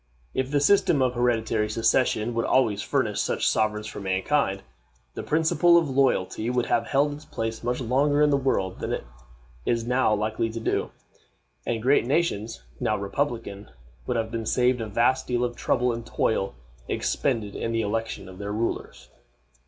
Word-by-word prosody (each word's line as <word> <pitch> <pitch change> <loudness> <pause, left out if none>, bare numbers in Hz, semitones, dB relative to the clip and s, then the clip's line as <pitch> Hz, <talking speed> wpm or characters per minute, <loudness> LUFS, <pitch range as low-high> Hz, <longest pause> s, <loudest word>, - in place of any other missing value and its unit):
If 130 0 -1
the 145 0 +2
system 155 -1 +4
of 125 -1 +1
hereditary 115 -3 +1
succession 115 +1 +1
would 115 0 0
always 110 -6 +2
furnish - - 0
such - - 0
sovereigns 105 -1 +1
for 110 - -7
mankind, 95 +2 0 0.5
the - - -5
principle 165 +2 +3
of 165 -5 +1
loyalty 125 -5 +1
would 125 -1 +1
have 115 -1 0
held 145 +2 +2
its 150 +1 -10
place 115 0 -4
much 125 +1 -1
longer 140 +4 +2
in 150 - +4
the - - +4
world 130 -9 0
than - - -3
it - - -3 0.6
is 115 -1 0
now 125 -1 +2
likely 110 +2 -1
to 115 +1 -5
do, - - -1 0.8
and 115 -1 -1
great 130 -2 +3
nations, 115 - -1 0.2
now 105 - 0
republican, 105 -1 -3 0.4
would - - 0
have 110 0 -2
been 115 -2 -4
saved 125 0 +2
a 110 - -3
vast 120 +5 +1
deal 120 0 0
of 120 -1 -2
trouble 125 -1 +1
and 115 0 -5
toil 100 - 0 0.3
expended 115 -7 -1
in 115 - -2
the 115 0 0
election 110 -2 -3
of 95 -1 -11
their 100 0 -4
rulers. 105 - -3
115 Hz, 175 wpm, -25 LUFS, 110-130 Hz, 0.8 s, system